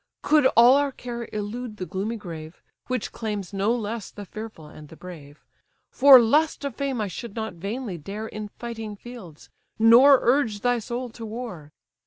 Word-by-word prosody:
Could 300 -3 +4
all 245 +3 +8
our 285 -1 +1
care 240 -2 -7
elude 215 +2 -5
the 185 - -4
gloomy 195 +5 -3
grave, 165 -5 -9 0.3
Which 255 -3 -3
claims 210 -4 -5
no 200 +3 +1
less 225 -2 -4
the 205 - -10
fearful 215 -5 -9
and 150 0 -13
the - - -12
brave, 155 -5 -12 0.5
For 270 -1 +8
lust 290 +6 +2
of 280 - -3
fame 275 -3 -2
I 210 - -1
should 200 +4 -8
not 220 -3 -4
vainly 200 +2 -5
dare 205 +8 -6
In 215 -1 -6
fighting 225 -1 -7
fields, 205 -9 -12 0.3
nor 240 +5 +7
urge 235 -5 +1
thy 245 0 +1
soul 245 +3 -5
to 230 - -10
war. 215 -9 -7
220 Hz, 175 wpm, -24 LUFS, 195-245 Hz, 0.5 s, all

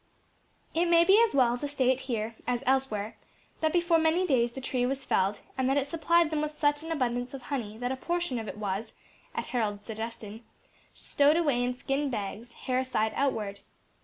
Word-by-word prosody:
It 340 +2 +2
may 340 0 +6
be 395 +5 +6
as 455 - +1
well 245 -2 +3
to 290 - -3
state 260 -2 +1
here, 225 -1 -2
as 245 +1 0
elsewhere, 250 -6 0 0.4
that 315 -1 +1
before 345 -1 +3
many 325 +3 +2
days 240 -7 +2
the 265 - -6
tree 255 -1 -1
was 270 +2 -1
felled, 195 +2 +1 0.2
and 260 0 +2
that 270 - +2
it 275 - +1
supplied 330 +2 +2
them 305 -1 0
with 300 0 -4
such 290 -1 +2
an 325 +1 -6
abundance 245 -3 -1
of 260 - -9
honey 235 -6 -4
that 245 +2 -2
a - - -1
portion 345 -2 -2
of 220 - -6
it - - -6
was, 205 +1 -3 0.4
at - - -2
Harold's 205 -4 -1
suggestion, 220 0 -6 0.5
stowed 290 +3 +3
away 285 -8 +2
in 250 0 -1
skin 275 +3 -1
bags, 220 +1 -5
hair 255 0 -1
side 220 -4 0
outward. 215 -8 -1
260 Hz, 195 wpm, -29 LUFS, 230-300 Hz, 0.5 s, may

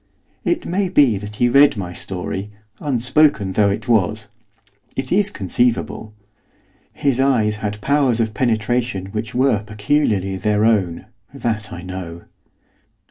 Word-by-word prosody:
It 345 -1 -1
may 190 +2 -1
be 135 - +4
that 105 +1 -8
he 120 - +2
read 140 0 +5
my 90 -3 -5
story, 95 +2 -4 0.3
unspoken 130 -5 +2
though 100 +1 +3
it 100 - -3
was, 110 -1 +1 0.7
it 130 -1 -4
is 205 +2 +4
conceivable. 110 - -1 0.8
His 135 -3 0
eyes 115 -6 +2
had 105 -1 -4
powers 135 -3 +2
of 110 -1 0
penetration 115 -3 -1
which 110 +2 -5
were 130 -5 +2
peculiarly 105 -3 0
their 105 +1 +1
own, 95 -7 +1 0.3
that 110 -2 -3
I 85 0 -7
know. 90 -2 -7
110 Hz, 135 wpm, -20 LUFS, 100-130 Hz, 0.8 s, read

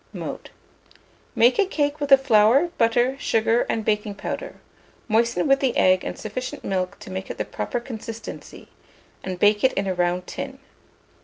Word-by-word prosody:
Mode. - - -6 0.9
Make 245 +2 +4
a 410 - +5
cake 290 -4 -1
with 285 -1 -3
the 275 - +9
flour, 265 +4 +4
butter, 240 +3 +2
sugar, 225 -2 +1
and 220 -2 -1
baking 210 -1 -1
powder; - - -5 0.5
moisten 235 +5 +1
with 275 0 +4
the 265 -3 0
egg 185 0 +4
and - - -5
sufficient 255 +6 -6
milk 185 0 -2
to - - -10
make 190 0 -5
it - - -6
the - - -2
proper 245 - -3
consistency, 230 -2 -9 0.5
and 185 -1 -4
bake 205 +2 +3
it 260 - +4
in 195 - -1
a 190 - -1
round 180 0 0
tin. 270 0 -6
230 Hz, 170 wpm, -23 LUFS, 200-265 Hz, 0.9 s, the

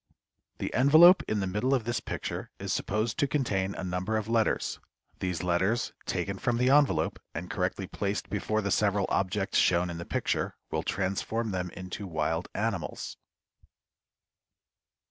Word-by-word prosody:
The - - -4
envelope 155 +9 +8
in 105 -1 0
the - - 0
middle 105 +9 +1
of 125 - -1
this 120 0 -1
picture - - -5
is - - -3
supposed 110 +5 -1
to 145 - +3
contain 100 -9 0
a - - -5
number 90 +4 -1
of 110 -1 -3
letters. 115 -1 +1 0.4
These 90 -2 -2
letters 95 +6 +1
taken 100 0 -2
from 120 -1 0
the 125 +2 +3
envelope, 145 0 +3 0.2
and 90 +2 -5
correctly 95 +1 -1
placed 100 +2 -3
before 110 +2 -1
the 100 - -1
several 100 -2 +2
objects 95 +1 +1
shown 85 0 +3
in 85 - -6
the 85 - -6
picture, - - -1 0.2
will - - 0
transform 100 +4 -1
them 90 -1 -2
into 95 +2 -6
wild 80 0 -1
animals. 105 -6 -3
100 Hz, 155 wpm, -29 LUFS, 90-115 Hz, 0.4 s, envelope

